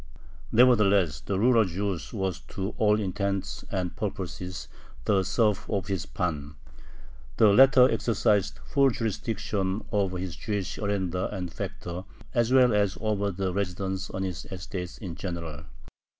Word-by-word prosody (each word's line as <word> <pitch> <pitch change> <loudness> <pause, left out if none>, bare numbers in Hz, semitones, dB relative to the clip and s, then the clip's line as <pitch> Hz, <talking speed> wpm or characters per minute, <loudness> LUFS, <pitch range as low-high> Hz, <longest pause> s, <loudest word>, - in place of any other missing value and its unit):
Nevertheless 100 - +4
the 100 +8 -2
rural 115 +2 +5
Jew 95 +2 -1 0.2
was 95 -4 -2
to 95 +2 -4
all 105 0 +4
intents 100 -1 -2
and 90 -3 -2
purposes 90 0 -5 0.4
the 100 -2 +3
serf 105 +1 +1
of 100 -4 -2
his 95 -2 -2
pan. 75 -5 -3 0.8
The 110 - +6
latter 130 +2 +7
exercised 105 -5 +1
full 140 -1 +3
jurisdiction 105 -3 -2
over 95 -3 0
his 90 -1 -4
Jewish 100 -4 -3
arendar 95 -3 -1
and 90 -4 -5
"factor" 90 -2 -5 0.3
as 120 -1 +2
well 130 -3 +6
as 100 -2 +1
over 105 -2 0
the 95 -1 -2
residents 95 0 -2
on 95 - -3
his 90 -3 -4
estates 90 -1 -6
in 95 -6 -6
general. 80 -4 -6
95 Hz, 135 wpm, -27 LUFS, 90-105 Hz, 0.8 s, latter